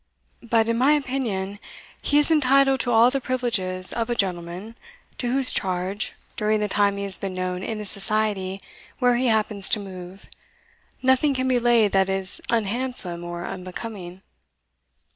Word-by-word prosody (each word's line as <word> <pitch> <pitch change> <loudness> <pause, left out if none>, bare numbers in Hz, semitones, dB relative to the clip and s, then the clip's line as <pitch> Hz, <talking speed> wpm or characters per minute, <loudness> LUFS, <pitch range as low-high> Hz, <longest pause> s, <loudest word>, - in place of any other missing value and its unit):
But, 230 -1 +1
in 230 0 0
my 275 +4 +5
opinion, 235 -9 -2 0.4
he 290 - +2
is 295 +2 +4
entitled 275 -2 +4
to 245 - -1
all 235 +2 +5
the 275 0 -1
privileges 215 -8 0
of 230 0 -2
a 240 - 0
gentleman, 185 +2 -3 0.4
to 245 - 0
whose 265 0 +2
charge, 185 +2 -2 0.2
during 215 -1 +1
the 210 - 0
time 200 0 +1
he 200 - -3
has 195 -1 0
been 195 -2 -4
known 185 0 -3
in 220 +3 -4
the 210 - -6
society 200 -1 -1 0.4
where 245 -1 +3
he 250 +1 +1
happens 215 -3 +1
to 215 - +1
move, 185 -1 -10 0.8
nothing 260 +2 +3
can 260 0 -1
be 255 -1 +2
laid 235 -4 +3
that 190 0 +2
is 190 0 -2
unhandsome 225 -5 0
or 175 0 -6
unbecoming. 185 0 -7
215 Hz, 160 wpm, -24 LUFS, 190-245 Hz, 0.8 s, my